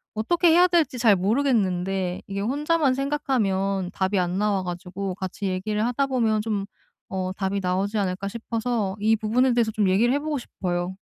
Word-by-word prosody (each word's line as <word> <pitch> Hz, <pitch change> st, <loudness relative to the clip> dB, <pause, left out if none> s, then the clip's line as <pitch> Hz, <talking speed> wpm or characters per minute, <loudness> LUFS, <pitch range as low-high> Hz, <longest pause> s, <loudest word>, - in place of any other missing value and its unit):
어떻게 340 Hz, -, +2 dB
해야 350 Hz, +3 st, +6 dB
될지 335 Hz, -7 st, +1 dB
잘 220 Hz, -4 st, +5 dB
모르겠는데 190 Hz, -4 st, 0 dB
이게 200 Hz, 0 st, -4 dB
혼자만 290 Hz, +5 st, +1 dB
생각하면 200 Hz, -10 st, 0 dB
답이 190 Hz, +1 st, 0 dB
안 180 Hz, 0 st, -1 dB
나와 205 Hz, -2 st, +1 dB
가지고 180 Hz, +2 st, -5 dB
'같이 190 Hz, +2 st, -5 dB
얘기를 210 Hz, +3 st, -1 dB
하다 250 Hz, +3 st, +1 dB
보면 225 Hz, -5 st, +1 dB
좀 210 Hz, -3 st, -2 dB, 0.5 s
어 185 Hz, -1 st, -2 dB
답이 195 Hz, 0 st, -2 dB
나오지 190 Hz, +3 st, -1 dB
않을까?' 190 Hz, -1 st, -1 dB
싶어서 225 Hz, -2 st, -2 dB
이 220 Hz, +2 st, +3 dB
부분에 240 Hz, +4 st, +2 dB
대해서 230 Hz, -2 st, +2 dB
좀 210 Hz, -3 st, +1 dB
얘기를 230 Hz, +7 st, +3 dB
해 285 Hz, -, +1 dB
보고 300 Hz, 0 st, -2 dB
싶어요. 180 Hz, -4 st, -3 dB
210 Hz, 375 characters per minute, -24 LUFS, 190-245 Hz, 0.5 s, 해야